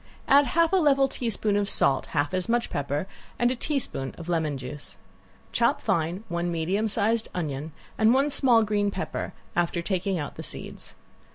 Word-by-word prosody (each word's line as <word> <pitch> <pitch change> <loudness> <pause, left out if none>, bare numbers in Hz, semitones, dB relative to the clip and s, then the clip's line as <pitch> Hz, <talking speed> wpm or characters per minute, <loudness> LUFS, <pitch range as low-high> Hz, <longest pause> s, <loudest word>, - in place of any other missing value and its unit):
Add 280 0 +6
half 335 +1 +4
a - - +6
level 275 -5 +4
teaspoon 220 -5 -1
of 205 -1 +1
salt, 135 - +2
half 145 +3 -1
as 185 +3 -1
much 240 0 +1
pepper, 145 +3 -1 0.3
and 240 +1 +3
a - - 0
teaspoon 245 - -3
of 165 - -9
lemon 160 -4 0
juice. 130 +3 -7 0.5
Chop - - +2
fine 170 +5 -1
one 170 0 -2
medium 180 +6 0
size 220 +2 +1
onion 155 -3 -3 0.3
and 220 0 +5
one 275 +3 +3
small 240 -5 +5
green 205 -1 +1
pepper, 195 -1 -4 0.2
after 170 0 0
taking 190 0 -1
out 145 -3 -5
the - - -5
seeds. - - -7
195 Hz, 175 wpm, -26 LUFS, 165-235 Hz, 0.5 s, Add